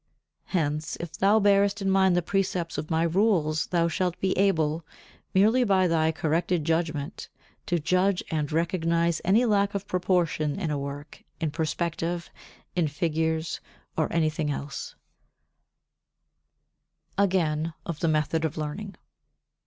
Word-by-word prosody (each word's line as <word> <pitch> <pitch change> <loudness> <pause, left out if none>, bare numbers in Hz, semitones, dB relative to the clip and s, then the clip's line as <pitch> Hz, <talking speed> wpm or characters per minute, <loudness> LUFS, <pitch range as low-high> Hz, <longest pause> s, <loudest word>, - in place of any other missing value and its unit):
Hence 155 -3 -1
if 170 -1 -7
thou 205 +3 +4
bearest 200 0 +3
in 195 - -2
mind 190 -1 +4
the 175 - +1
precepts 180 -3 -1
of 155 - -6
my 165 0 +2
rules 170 -3 +2
thou 170 -2 +2
shalt 180 +1 -1
be 190 -1 0
able, 165 -5 +2 0.5
merely 220 +7 +4
by 195 -4 +3
thy 160 -2 +2
corrected 165 +1 0
judgement, 160 -1 -2 0.4
to 175 - +1
judge 180 +4 +1
and 150 -2 -1
recognize 170 0 +1
any 210 +7 +4
lack 200 -2 +2
of 200 0 -3
proportion 175 -4 0
in 165 -6 -2
a 145 - -1
work, 140 +2 -7 0.2
in 160 -2 -1
perspective, 170 +2 -2 0.4
in 175 -3 +2
figures 160 +1 -1 0.4
or 155 - 0
anything 155 -2 0
else. 140 0 -5 2.2
[Sidenote: 200 - +1
Again 165 -4 +1
of 165 -3 -4
the 165 - +1
Method 155 +1 +1
of 160 -1 -2
Learning] 175 +7 -4
60. - - -25
170 Hz, 140 wpm, -27 LUFS, 155-190 Hz, 2.2 s, thou